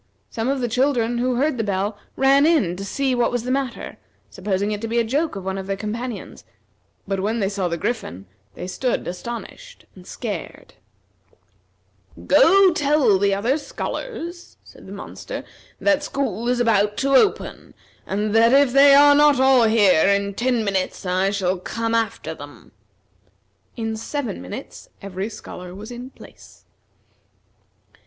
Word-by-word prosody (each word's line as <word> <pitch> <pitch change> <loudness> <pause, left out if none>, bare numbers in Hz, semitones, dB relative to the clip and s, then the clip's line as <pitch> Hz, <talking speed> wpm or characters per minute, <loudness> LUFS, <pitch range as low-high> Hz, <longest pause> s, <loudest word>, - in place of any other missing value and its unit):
Some 230 +1 -2
of 275 -1 -1
the 245 - 0
children 240 -1 +1
who 250 +1 0
heard 270 0 0
the - - +1
bell 200 +1 -1 0.2
ran 270 +1 +4
in 280 - +2
to 195 - -6
see 265 +6 -1
what 245 -1 +1
was 245 -2 -2
the 250 - -3
matter, 265 -2 -3 0.3
supposing 200 +1 -2
it 210 -1 -3
to 225 - -3
be 230 +1 -2
a 235 - +3
joke 285 +7 -1
of 195 -1 -7
one 190 0 -3
of 190 - -7
their 195 0 -2
companions; 225 +3 -6 0.6
but 195 0 -1
when 215 +4 -1
they 195 -2 0
saw 195 -3 -2
the 170 -1 -2
Griffin 160 - -4 0.3
they - - -6
stood 245 +7 -2
astonished, 235 - -8
and - - -15
scared. - - -7 1.5
"Go 390 -6 +6
tell 285 - +3
the 200 0 +2
other 240 +9 0
scholars," 345 0 -6
said - - -16
the - - -10
monster, - - -7 0.4
"that 295 -1 +2
school 255 -6 -2
is 250 0 +1
about 210 -3 +2
to 275 0 0
open, 400 +10 +1 0.3
and 210 +2 -1
that 230 +2 +5
if 275 -2 +4
they 275 0 +7
are 290 0 +7
not 290 -2 +5
all 265 -3 +5
here 205 -7 +4
in 200 0 +1
ten 240 +1 0
minutes, 190 -1 -2
I 185 +1 +1
shall 190 -2 -1
come 230 +4 -3
after 230 -1 -1
them." - - -13 1.1
In 225 -1 -3
seven 235 - -4
minutes 90 - -9
every 195 +1 -5
scholar 180 -4 -10
was 215 +4 -9
in 245 +1 -8
place. - - -17
230 Hz, 160 wpm, -22 LUFS, 200-270 Hz, 1.5 s, they